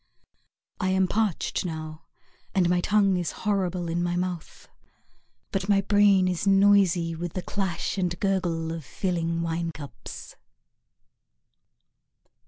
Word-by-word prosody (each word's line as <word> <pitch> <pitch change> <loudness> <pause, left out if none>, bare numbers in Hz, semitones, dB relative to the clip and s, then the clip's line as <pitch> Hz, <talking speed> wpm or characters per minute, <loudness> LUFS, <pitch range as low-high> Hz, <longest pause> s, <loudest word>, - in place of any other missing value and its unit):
I 185 - 0
am 190 0 +2
parched 210 -3 -1
now, 155 -2 -6 0.5
and 185 -3 +3
my 175 0 +2
tongue 200 -1 +3
is 175 -2 -2
horrible 185 -4 0
in 170 +1 -1
my 175 0 0
mouth, 180 -2 -4 0.8
But 195 +1 -2
my 200 -1 +4
brain 200 -2 +4
is 180 +2 -1
noisy 195 -4 +4
With 170 0 -5
the 185 - -4
clash 190 -1 -2
and 175 -2 -1
gurgle 175 -5 0
of 165 -1 -6
filling 170 +1 -2
wine 165 0 -2
cups. 145 -3 -10
180 Hz, 125 wpm, -26 LUFS, 170-195 Hz, 0.8 s, my